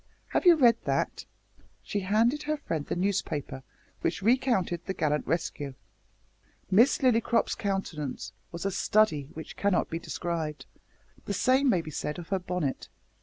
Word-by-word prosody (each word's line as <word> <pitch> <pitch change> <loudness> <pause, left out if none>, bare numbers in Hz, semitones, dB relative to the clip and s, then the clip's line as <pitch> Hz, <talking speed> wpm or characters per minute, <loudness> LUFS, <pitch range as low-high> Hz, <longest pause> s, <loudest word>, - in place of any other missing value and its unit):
Have - - +1
you 345 - +9
read 240 -6 +5
that?" - - -1 0.6
She 205 - -2
handed 225 +9 +2
her 305 0 -1
friend 160 - -4
the - - -2
newspaper 175 -8 -2 0.4
which 180 - -1
recounted 225 -7 +2
the 190 - -4
"gallant 150 -1 0
rescue." 145 -4 -2 1.0
Miss 230 +9 +5
Lillycrop's 235 -1 +3
countenance 195 -8 -3 0.2
was 170 +2 -6
a 195 - +1
study 180 -9 +2
which 160 - -8
cannot 200 -2 +1
be 165 - -2
described. 160 -5 -4 0.6
The 200 - -2
same 260 +6 +3
may 185 -8 +3
be 155 - -7
said 150 +1 -3
of 175 -2 -8
her 195 -1 +1
bonnet. 180 -6 -3
185 Hz, 150 wpm, -28 LUFS, 160-230 Hz, 1.0 s, you